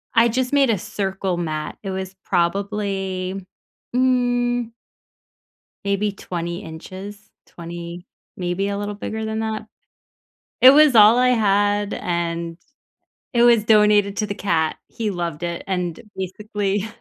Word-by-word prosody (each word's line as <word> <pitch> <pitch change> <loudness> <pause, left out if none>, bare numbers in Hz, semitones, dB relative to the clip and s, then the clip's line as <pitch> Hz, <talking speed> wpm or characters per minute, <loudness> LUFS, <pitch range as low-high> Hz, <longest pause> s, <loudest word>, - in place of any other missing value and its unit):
I 230 +1 +6
just 255 +3 -1
made 275 -3 +4
a 220 - +2
circle 195 -2 -3
mat. 155 -3 -3
It 195 - -4
was 190 0 -5
probably, 195 0 -1 0.5
mm 245 -2 +1 1.1
maybe 200 +1 0
20 175 -1 -5
inches, 190 +5 -9 0.2
20 170 +1 -8 0.3
maybe 180 +2 -1
a 200 0 -2
little 205 0 -3
bigger 220 +2 -5
than 220 0 -2
that. 220 -1 -3 1.0
It 255 - +11
was 295 -3 +6
all 215 +2 +8
I 250 0 +4
had, 205 -2 +2
and 170 -1 -3 0.8
it 235 -1 +4
was 235 -3 +5
donated 210 -2 +4
to 210 - 0
the 200 - -4
cat. 160 -5 0
He 220 -2 -3
loved 170 -3 -4
it. 170 0 -3
And, 180 -3 -2 0.2
basically, 200 +2 -2
200 Hz, 130 wpm, -22 LUFS, 180-220 Hz, 1.1 s, It